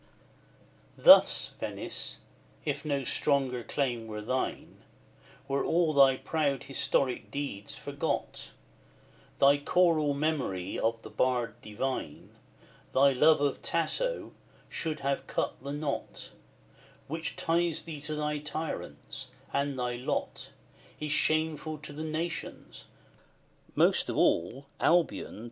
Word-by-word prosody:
XVII. -, -, -18 dB
Thus, -, -, +8 dB
Venice, -, -, -3 dB, 0.5 s
if 145 Hz, -1 st, -2 dB
no 140 Hz, -3 st, -1 dB
stronger 135 Hz, -2 st, +1 dB
claim 120 Hz, -5 st, -2 dB
were 105 Hz, -1 st, -6 dB
thine, 130 Hz, +4 st, -3 dB, 0.7 s
Were 140 Hz, 0 st, 0 dB
all 165 Hz, -2 st, +2 dB
thy 135 Hz, -2 st, +6 dB
proud 145 Hz, -4 st, -1 dB
historic 135 Hz, -1 st, 0 dB
deeds 140 Hz, -8 st, -4 dB
forgot, -, -, -3 dB, 0.9 s
Thy 140 Hz, +1 st, +5 dB
choral 155 Hz, -2 st, +3 dB
memory 140 Hz, -, -1 dB
of 115 Hz, 0 st, 0 dB
the -, -, -9 dB
bard 125 Hz, -2 st, +1 dB
divine, 130 Hz, +5 st, -4 dB, 0.6 s
Thy 140 Hz, +1 st, +6 dB
love 150 Hz, +3 st, +5 dB
of 140 Hz, -2 st, 0 dB
Tasso, -, -, -1 dB, 0.4 s
should 155 Hz, -2 st, -3 dB
have 140 Hz, 0 st, -1 dB
cut -, -, -2 dB
the 140 Hz, +1 st, -5 dB
knot 145 Hz, -1 st, -4 dB, 0.8 s
Which 160 Hz, +2 st, -4 dB
ties 170 Hz, 0 st, +1 dB
thee 155 Hz, -4 st, -7 dB
to 155 Hz, +1 st, -3 dB
thy 150 Hz, 0 st, -1 dB
tyrants; 150 Hz, +2 st, -5 dB, 0.3 s
and 140 Hz, -1 st, 0 dB
thy 125 Hz, -1 st, -2 dB
lot 125 Hz, -, -3 dB, 0.5 s
Is 150 Hz, -1 st, -3 dB
shameful 155 Hz, +1 st, +1 dB
to 150 Hz, 0 st, -8 dB
the 155 Hz, +2 st, -5 dB
nations, 160 Hz, +2 st, -5 dB, 0.9 s
most -, -, +3 dB
of -, -, -2 dB
all, 115 Hz, +12 st, +2 dB
Albion! 170 Hz, -9 st, +2 dB
145 Hz, 120 wpm, -30 LUFS, 130-155 Hz, 0.9 s, Thus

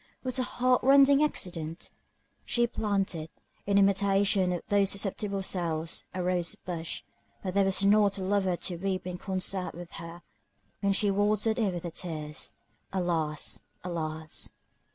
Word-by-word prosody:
What 255 Hz, 0 st, -1 dB
a -, -, +2 dB
heart 250 Hz, 0 st, +2 dB
rending 275 Hz, +2 st, +6 dB
accident! 170 Hz, -, -2 dB, 0.5 s
She 240 Hz, 0 st, +2 dB
planted, 195 Hz, -8 st, -1 dB, 0.4 s
in 200 Hz, 0 st, +3 dB
imitation 195 Hz, -1 st, +3 dB
of 175 Hz, -, -3 dB
those 200 Hz, -1 st, +3 dB
susceptible 200 Hz, 0 st, -1 dB
souls, 165 Hz, -3 st, -2 dB
a 185 Hz, 0 st, -3 dB
rose 180 Hz, -1 st, 0 dB
bush; 170 Hz, -3 st, -4 dB, 0.4 s
but 185 Hz, -2 st, -2 dB
there 200 Hz, 0 st, +4 dB
was 195 Hz, +1 st, +3 dB
not 205 Hz, 0 st, +4 dB
a 190 Hz, -, -3 dB
lover 190 Hz, -1 st, +1 dB
to 175 Hz, 0 st, -2 dB
weep 185 Hz, 0 st, -2 dB
in 180 Hz, -1 st, -5 dB
concert 190 Hz, -1 st, 0 dB
with 175 Hz, 0 st, -9 dB
her, 170 Hz, +1 st, -9 dB, 0.6 s
when 200 Hz, -1 st, +2 dB
she 200 Hz, +1 st, +2 dB
watered 210 Hz, +3 st, +2 dB
it 210 Hz, -4 st, +2 dB
with 175 Hz, -2 st, -5 dB
her 170 Hz, -, -4 dB
tears. 155 Hz, -4 st, -4 dB, 0.4 s
Alas! 165 Hz, -5 st, -1 dB, 0.2 s
Alas! 160 Hz, -3 st, -4 dB
190 Hz, 150 wpm, -29 LUFS, 175-205 Hz, 0.6 s, rending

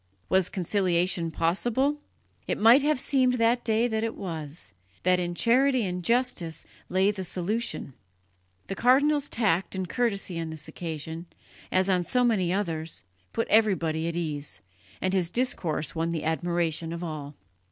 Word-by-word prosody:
Was 190 Hz, -2 st, +3 dB
conciliation 180 Hz, -2 st, +1 dB
possible? 235 Hz, -, +1 dB, 0.5 s
It -, -, 0 dB
might 230 Hz, +6 st, +7 dB
have 295 Hz, -1 st, +2 dB
seemed 260 Hz, -2 st, +2 dB
that 235 Hz, +1 st, +2 dB
day 225 Hz, +1 st, +2 dB
that 220 Hz, -2 st, -1 dB
it 225 Hz, -, -2 dB
was 160 Hz, -, -6 dB, 0.3 s
that 180 Hz, 0 st, +3 dB
in 175 Hz, -1 st, -2 dB
charity 255 Hz, +3 st, +3 dB
and 180 Hz, -1 st, -3 dB
justice 230 Hz, -8 st, 0 dB, 0.2 s
lay 190 Hz, +2 st, +3 dB
the 195 Hz, -2 st, -5 dB
solution. 185 Hz, -, -2 dB, 0.7 s
The -, -, -4 dB
cardinal's 280 Hz, +6 st, +3 dB
tact 195 Hz, -5 st, +1 dB
and 190 Hz, -1 st, -2 dB
courtesy 200 Hz, -6 st, -1 dB
on 165 Hz, -1 st, -3 dB
this 160 Hz, -1 st, -7 dB
occasion, 165 Hz, 0 st, -6 dB, 0.4 s
as 185 Hz, +1 st, +3 dB
on 185 Hz, -2 st, +2 dB
so 250 Hz, +7 st, +1 dB
many 200 Hz, -8 st, +2 dB
others, 165 Hz, -5 st, -2 dB, 0.3 s
put 230 Hz, -, -1 dB
everybody 170 Hz, -7 st, +2 dB
at 170 Hz, -, -3 dB
ease, 150 Hz, -7 st, -4 dB, 0.4 s
and 185 Hz, 0 st, 0 dB
his 180 Hz, -3 st, +1 dB
discourse 175 Hz, -, -1 dB
won 165 Hz, 0 st, -1 dB
the 165 Hz, -2 st, -2 dB
admiration 165 Hz, 0 st, -1 dB
of 170 Hz, +1 st, -5 dB
all. 150 Hz, -3 st, -6 dB
185 Hz, 150 wpm, -27 LUFS, 165-230 Hz, 0.7 s, might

